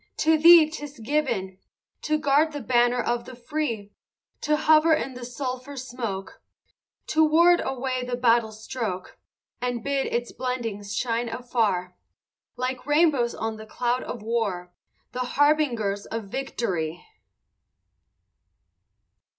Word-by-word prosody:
to 320 +1 +4
thee 330 0 +8
'tis 295 -2 -8
given 225 -7 -2 0.4
To 305 0 +1
guard 300 +1 +2
the 290 - -4
banner 245 -1 +2
of 240 0 -1
the 255 - -10
free, 235 -5 -3 0.5
To 300 0 +2
hover 315 +1 +5
in 270 -4 -3
the 250 0 -9
sulphur 255 +2 -5
smoke, 235 -7 -5 0.6
To 315 +1 +3
ward 340 +3 +5
away 260 -1 -2
the 250 0 -2
battle 235 -2 +3
stroke, 215 -4 -5 0.4
And 245 -2 -2
bid 280 -1 0
its 240 0 -2
blendings 225 -5 -4
shine 235 -1 -1
afar, 215 -8 -1 0.6
Like 255 +1 -3
rainbows 295 -6 +3
on 220 0 -3
the 220 0 -10
cloud 245 +3 -1
of 235 -4 -6
war, 205 -6 -2 0.4
The 250 - -6 0.2
harbingers 250 -9 +2
of 225 0 -4
victory! 190 -11 -3
245 Hz, 125 wpm, -25 LUFS, 225-290 Hz, 0.6 s, thee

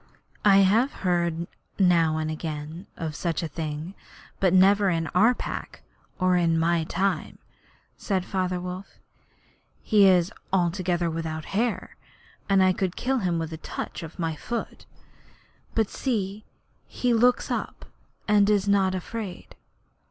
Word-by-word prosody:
'I 200 -2 +6
have 225 +8 +3
heard 170 -2 +1 0.3
now 170 -4 +3
and 155 0 -2
again 155 +3 -6
of 160 -2 -4
such 170 0 -2
a - - -1
thing, 155 +2 -5 0.5
but 190 -2 +3
never 195 +2 +5
in 165 -2 0
our 225 +7 +5
Pack - - -6 0.3
or 185 -1 +2
in 170 -2 +2
my 165 0 +1
time,' 195 +4 -1 0.6
said 190 -3 -1
Father 185 -1 -1
Wolf. 180 +2 -7 0.9
'He 205 -3 +5
is 185 +1 +3 0.2
altogether 175 -1 +1
without 160 -1 -4
hair, 230 +3 -1 0.5
and 195 -1 +5
I 185 0 +4
could 185 -1 -2
kill 265 +1 0
him 180 -5 0
with 165 0 -3
a - - -5
touch - - -6
of 165 -1 -9
my 165 -2 -2
foot. 235 +9 -5 0.9
But 220 -2 +2
see, 210 -5 -2 0.4
he 245 -1 0
looks 245 +2 +3
up - - -4 0.4
and 205 -1 +4
is 205 -1 +2
not 195 -2 +3
afraid.' 200 0 -6
185 Hz, 140 wpm, -26 LUFS, 165-200 Hz, 0.9 s, I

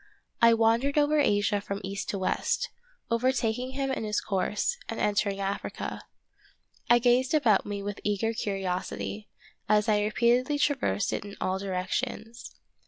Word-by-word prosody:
I 230 0 +7
wandered 230 +6 +2
over 295 +1 +4
Asia 205 -5 +2
from 200 -1 -4
east 200 +2 -4
to 200 - -1
west, 190 - -1 0.4
overtaking 250 +1 0
him 270 0 -1
in 260 - -2
his 210 -1 0
course, 205 - -1
and - - -4
entered 205 -1 +1
Africa. 195 0 -4 0.9
I 240 - +7
gazed 250 +4 +3
about 235 -9 +3
me 200 -1 -4
with 205 0 -4
eager 210 +2 0
curiosity, 195 0 -3 0.4
as 210 +1 +3
I 210 -1 +3
repeatedly 240 +6 +2
traversed 270 - 0
it - - -2
in 205 0 -10
all 190 +1 -1
direc 190 -2 -3
tions. 235 -2 -4
215 Hz, 150 wpm, -28 LUFS, 200-245 Hz, 0.9 s, I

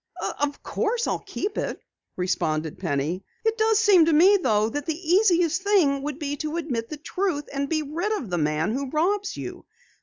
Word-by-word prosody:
"Of 290 0 -2
course, 465 +2 -1
I'll - - -1
keep 410 +1 -3
it," - - -3 0.4
responded 160 -4 -1
Penny. 165 +2 -2 0.2
"It 445 0 +2
does 440 -1 +3
seem 400 -6 +6
to 325 - +2
me, 365 +7 +7
though, 215 -7 +2
that 290 +5 -4
the 320 - 0
easiest 355 -1 +3
thing 360 -9 +3
would 290 0 -4
be 290 -2 -3
to 310 +3 -3
admit 245 -9 -3
the 305 - -6
truth 335 -1 -2
and 280 0 -2
be 310 -1 0
rid 335 +8 -3
of 250 - -4
the 175 - 0
man 155 +6 0
who 270 +1 -3
robs 385 +7 0
you. - - -7
305 Hz, 190 wpm, -25 LUFS, 235-380 Hz, 0.4 s, me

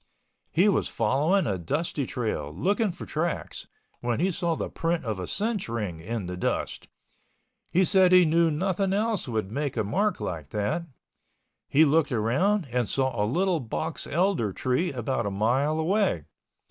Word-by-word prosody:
He 180 +6 +3
was 200 - +2
following 165 +9 +1
a 95 -3 -1
dusty 145 - -2
trail, 110 - -3
looking 200 - +1
for 175 - -9
tracks, 165 +2 -3 0.3
when 120 0 -1
he 185 +3 +2
saw 170 -1 -1
the - - -3
print 165 -2 -2
of 110 -4 -2
a 90 - -4
cinch 210 - -1
ring 105 -8 -3
in 105 +4 -4
the 90 0 -4
dust. 90 - -2 0.8
He 185 +2 +4
said 190 -1 +5
he 180 -1 +7
knew 165 +1 +3
nothing 190 +4 0
else 215 -2 0
would 110 -4 -2
make 140 0 -2
a 110 - +2
mark 195 - 0
like 80 -5 -5
that. 105 +12 -2 0.8
He 155 +3 +5
looked 150 0 +2
around 140 - +1
and 120 -3 0
saw 130 -1 +1
a 105 -2 0
little 180 +4 +1
box 150 +6 -4
elder 170 - +1
tree 130 - 0
about 120 -3 -2
a - - 0
mile 125 +10 +1
away. 170 - +1
150 Hz, 170 wpm, -27 LUFS, 110-180 Hz, 0.8 s, he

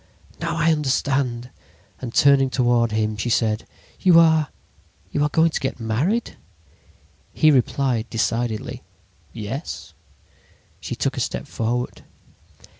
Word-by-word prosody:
Now 170 -1 -2
I 165 0 +3
understand: 135 -4 0 0.5
"And 125 -3 -5
turning 140 +1 +4
toward 120 -3 +2
him, 110 0 -1
she 105 +4 -2
said: 110 -1 0 0.3
"'You 175 -3 +6
are—you 155 - -1
are 150 - +2
going 165 +2 +3
to - - -2
get 135 -2 -3
married?' 140 - -1 1.0
"He 155 - +5
replied 125 -3 +1
decidedly" 115 -1 -2 0.5
'Yes.' 115 +7 -6 0.9
"She - - -5
took - - -2
a - - 0
step - - -3
forward. 120 +2 -3
125 Hz, 115 wpm, -22 LUFS, 115-150 Hz, 1.0 s, You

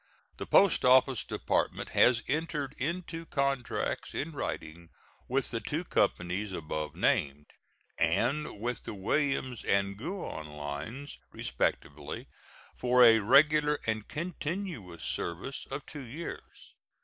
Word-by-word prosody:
The - - -6
Post 195 -2 +5
Office 130 -1 +5
Department - - -1
has 120 -1 +4
entered 150 -1 -1
into 165 +3 -3
contracts 140 -3 -1
in 155 +4 -2
writing 85 - -5 0.4
with 135 +1 0
the 115 - -1
two 150 +9 -3
companies 95 - 0
above 75 -2 -4
named, 70 +1 +1 0.5
and 120 - +1
with 120 +1 -3
the - - -5
Williams 130 +3 0
and 100 0 +1
Guion 155 - -5
lines, 75 - -6
respectively, 75 0 -3 0.5
for 125 0 +5
a 115 -2 +8
regular 150 +6 +5
and 110 -1 -1
continuous 160 - -4
service 90 +11 -3
of 135 +2 -5
two 145 -3 -8
years. 145 +8 -8
125 Hz, 115 wpm, -30 LUFS, 95-150 Hz, 0.5 s, a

